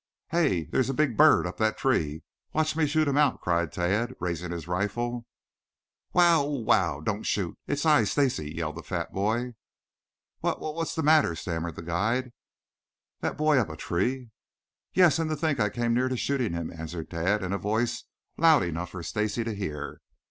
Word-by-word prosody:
"Hey! 160 Hz, -, +2 dB
There's 130 Hz, +9 st, 0 dB
a 135 Hz, -, -1 dB
big 150 Hz, -5 st, +1 dB
bird 155 Hz, -8 st, +6 dB
up 90 Hz, 0 st, -5 dB
that 110 Hz, 0 st, +1 dB
tree. 80 Hz, -, 0 dB, 0.3 s
Watch 155 Hz, -1 st, +1 dB
me 160 Hz, -2 st, +2 dB
shoot 155 Hz, +1 st, +2 dB
him 140 Hz, +1 st, +2 dB
out," 145 Hz, -3 st, +3 dB
cried 85 Hz, -2 st, 0 dB
Tad, 105 Hz, +8 st, -1 dB
raising 90 Hz, -1 st, -3 dB
his 85 Hz, -2 st, -5 dB
rifle. 115 Hz, +6 st, -2 dB, 0.8 s
"Wow, 170 Hz, -3 st, +5 dB
oh, 140 Hz, -, -2 dB
wow! 95 Hz, -, +1 dB
Don't 105 Hz, +6 st, -2 dB
shoot! 95 Hz, -5 st, -1 dB
It's 145 Hz, +2 st, -1 dB
I, 150 Hz, -8 st, +5 dB
Stacy," 120 Hz, -, 0 dB
yelled 80 Hz, -1 st, -4 dB
the -, -, -6 dB
fat 85 Hz, -3 st, -4 dB
boy. 115 Hz, +5 st, -1 dB, 0.9 s
"What -, -, -1 dB
what 155 Hz, -, -4 dB
what's 165 Hz, 0 st, -3 dB
that?" 155 Hz, -, +3 dB
stammered 85 Hz, -2 st, -4 dB
the -, -, -8 dB
guide. 110 Hz, +10 st, -1 dB, 0.9 s
"That -, -, -3 dB
boy 155 Hz, -2 st, +4 dB
up 115 Hz, -, 0 dB
a 80 Hz, -, -7 dB
tree?" 120 Hz, +10 st, -2 dB, 0.6 s
"Yes, 175 Hz, -3 st, +5 dB
and 160 Hz, -1 st, 0 dB
to 155 Hz, -, 0 dB
think 150 Hz, -3 st, 0 dB
I 105 Hz, -1 st, +2 dB
came 120 Hz, +1 st, -1 dB
near 130 Hz, +1 st, +1 dB
shooting 125 Hz, -7 st, -1 dB
him," 85 Hz, -1 st, -4 dB
answered 80 Hz, 0 st, -7 dB
Tad, 95 Hz, +5 st, 0 dB
in 95 Hz, +1 st, -2 dB
a 100 Hz, -, -1 dB
voice 115 Hz, +5 st, -1 dB, 0.3 s
loud 160 Hz, -, +5 dB
enough 85 Hz, +1 st, -3 dB
for 90 Hz, -2 st, -7 dB
Stacy 105 Hz, +5 st, -1 dB
to 115 Hz, -1 st, -3 dB
hear. 75 Hz, -8 st, -5 dB
110 Hz, 185 wpm, -27 LUFS, 85-140 Hz, 0.9 s, bird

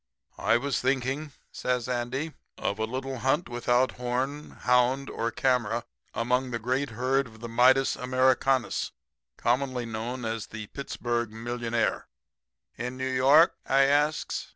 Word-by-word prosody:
"'I -, -, +3 dB
was 140 Hz, +2 st, -1 dB
thinking,' 135 Hz, +3 st, -1 dB, 0.2 s
says 125 Hz, -1 st, -1 dB
Andy, 125 Hz, +5 st, -2 dB, 0.2 s
'of 100 Hz, -, -2 dB
a 110 Hz, -, +1 dB
little 130 Hz, +2 st, -4 dB
hunt 140 Hz, +7 st, +1 dB
without 120 Hz, +1 st, +1 dB
horn, 130 Hz, +4 st, -2 dB
hound 125 Hz, +2 st, +2 dB
or 115 Hz, -, -1 dB
camera 125 Hz, -5 st, 0 dB, 0.3 s
among 125 Hz, +2 st, +1 dB
the 120 Hz, -, -2 dB
great 130 Hz, +5 st, -1 dB
herd 130 Hz, +4 st, 0 dB
of 110 Hz, -1 st, -15 dB
the 120 Hz, -, -6 dB
Midas 130 Hz, +3 st, +4 dB
Americanus, 130 Hz, 0 st, +1 dB, 0.4 s
commonly 125 Hz, 0 st, 0 dB
known 115 Hz, +2 st, -4 dB
as 110 Hz, -2 st, -3 dB
the 110 Hz, -1 st, -7 dB
Pittsburg 120 Hz, -4 st, -2 dB
millionaires.' 115 Hz, 0 st, -1 dB, 0.7 s
"'In 125 Hz, +1 st, -5 dB
New 130 Hz, 0 st, -2 dB
York?' 140 Hz, +7 st, +5 dB
I 135 Hz, +1 st, +5 dB
asks. 145 Hz, +2 st, +1 dB
125 Hz, 135 wpm, -28 LUFS, 120-135 Hz, 0.7 s, York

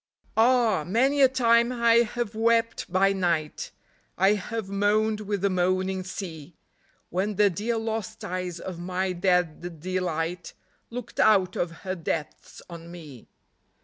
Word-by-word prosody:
Ah, 225 Hz, -6 st, +3 dB
many 260 Hz, -, +2 dB
a 265 Hz, -, +8 dB
time 235 Hz, -2 st, +3 dB
I 235 Hz, -2 st, +4 dB
have 235 Hz, -1 st, 0 dB
wept 230 Hz, -2 st, +1 dB
by 195 Hz, +1 st, +3 dB
night, 170 Hz, -5 st, -1 dB, 0.5 s
I 195 Hz, +3 st, +4 dB
have 215 Hz, +1 st, -4 dB
moaned 210 Hz, +2 st, +1 dB
with 205 Hz, -2 st, -3 dB
the 200 Hz, -, +2 dB
moaning 185 Hz, +1 st, 0 dB
sea, 170 Hz, -4 st, -7 dB, 0.6 s
When 195 Hz, +4 st, -1 dB
the 205 Hz, 0 st, +4 dB
dear 225 Hz, +7 st, -2 dB
lost 220 Hz, -1 st, -4 dB
eyes 180 Hz, -1 st, -4 dB
of 180 Hz, -1 st, -7 dB
my 185 Hz, +1 st, -2 dB
dead 175 Hz, -2 st, 0 dB
delight 180 Hz, -1 st, -3 dB, 0.4 s
Looked 240 Hz, 0 st, -8 dB
out 190 Hz, -4 st, +4 dB
of 175 Hz, -, -1 dB
her 185 Hz, -, -1 dB
depths 165 Hz, -4 st, -5 dB
on 170 Hz, -1 st, -10 dB
me. 150 Hz, -8 st, -11 dB
190 Hz, 140 wpm, -26 LUFS, 175-225 Hz, 0.6 s, a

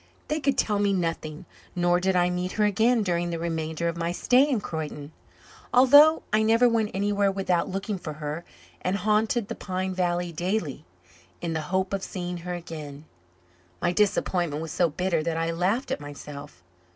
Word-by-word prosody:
They 305 Hz, +1 st, 0 dB
could 275 Hz, -2 st, 0 dB
tell 210 Hz, -2 st, +1 dB
me 200 Hz, -1 st, +2 dB
nothing; 165 Hz, -3 st, -3 dB, 0.3 s
nor 175 Hz, 0 st, +3 dB
did 190 Hz, +1 st, +1 dB
I 180 Hz, 0 st, +3 dB
meet 180 Hz, +1 st, -2 dB
her 210 Hz, -, +2 dB
again 225 Hz, +3 st, +3 dB
during 175 Hz, -2 st, 0 dB
the 170 Hz, -, -2 dB
remainder 165 Hz, 0 st, -2 dB
of 170 Hz, -, -1 dB
my 170 Hz, 0 st, -1 dB
stay 255 Hz, +10 st, +3 dB
in 255 Hz, -6 st, +1 dB
Croyden, 155 Hz, -5 st, -5 dB, 0.6 s
although 285 Hz, +5 st, +7 dB
I 215 Hz, -, +4 dB
never 230 Hz, +3 st, +4 dB
went 225 Hz, -3 st, +1 dB
anywhere 200 Hz, 0 st, +1 dB
without 190 Hz, -3 st, 0 dB
looking 195 Hz, +1 st, -3 dB
for 155 Hz, -3 st, -6 dB
her, 150 Hz, +2 st, -5 dB, 0.4 s
and 185 Hz, +2 st, 0 dB
haunted 215 Hz, +2 st, +1 dB
the -, -, -4 dB
pine 185 Hz, 0 st, -3 dB
valley 175 Hz, -1 st, -1 dB
daily, 175 Hz, -2 st, -2 dB, 0.5 s
in 170 Hz, -1 st, -3 dB
the 160 Hz, -, -1 dB
hope 190 Hz, +1 st, 0 dB
of 195 Hz, -, -1 dB
seeing 180 Hz, -2 st, -5 dB
her 175 Hz, +1 st, -5 dB
again. 155 Hz, -4 st, -8 dB, 0.7 s
My 175 Hz, -, +1 dB
disappointment 175 Hz, -5 st, +1 dB
was 160 Hz, -, -6 dB
so 175 Hz, 0 st, +2 dB
bitter 175 Hz, +1 st, 0 dB
that 165 Hz, 0 st, -2 dB
I 165 Hz, 0 st, 0 dB
laughed 185 Hz, +10 st, 0 dB
at -, -, -1 dB
myself. 145 Hz, -8 st, -9 dB
180 Hz, 180 wpm, -26 LUFS, 165-205 Hz, 0.7 s, although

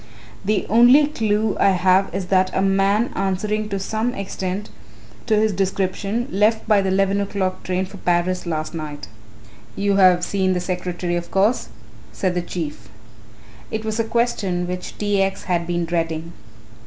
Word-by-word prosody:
"The 205 Hz, +1 st, 0 dB
only 245 Hz, +7 st, +6 dB
clue 220 Hz, -7 st, 0 dB
I 195 Hz, -, +4 dB
have 185 Hz, +1 st, +3 dB
is 190 Hz, -, -3 dB
that 185 Hz, 0 st, +4 dB
a -, -, +2 dB
man 195 Hz, +4 st, +2 dB
answering 210 Hz, +3 st, -1 dB
to 200 Hz, -, -2 dB
some 220 Hz, +5 st, -2 dB
extent 195 Hz, 0 st, -4 dB, 0.6 s
to 220 Hz, -, +3 dB
his 215 Hz, 0 st, +2 dB
description 195 Hz, +4 st, -1 dB
left 215 Hz, +3 st, +2 dB
by 210 Hz, -2 st, +4 dB
the 195 Hz, -, -1 dB
eleven 195 Hz, +1 st, +2 dB
o'clock 190 Hz, -2 st, -2 dB
train 185 Hz, +1 st, -1 dB
for 195 Hz, +2 st, -11 dB
Paris 180 Hz, 0 st, 0 dB
last 155 Hz, -1 st, -3 dB
night." 155 Hz, -3 st, -6 dB, 0.7 s
"You 200 Hz, 0 st, +1 dB
have 180 Hz, -2 st, +5 dB
seen 190 Hz, -2 st, +1 dB
the 180 Hz, -, 0 dB
secretary 180 Hz, -1 st, -3 dB
of 170 Hz, 0 st, -5 dB
course," 200 Hz, -, +1 dB, 0.4 s
said 185 Hz, -2 st, -1 dB
the 180 Hz, -, -1 dB
Chief. 155 Hz, -, -6 dB, 0.8 s
It 220 Hz, 0 st, -4 dB
was 220 Hz, +1 st, -2 dB
a -, -, +3 dB
question 220 Hz, -6 st, 0 dB
which 180 Hz, 0 st, -6 dB
T. 205 Hz, -1 st, +1 dB
X. 195 Hz, 0 st, -1 dB
had 170 Hz, -2 st, -1 dB
been 175 Hz, -1 st, -1 dB
dreading. 165 Hz, 0 st, -2 dB
195 Hz, 165 wpm, -21 LUFS, 180-210 Hz, 0.8 s, only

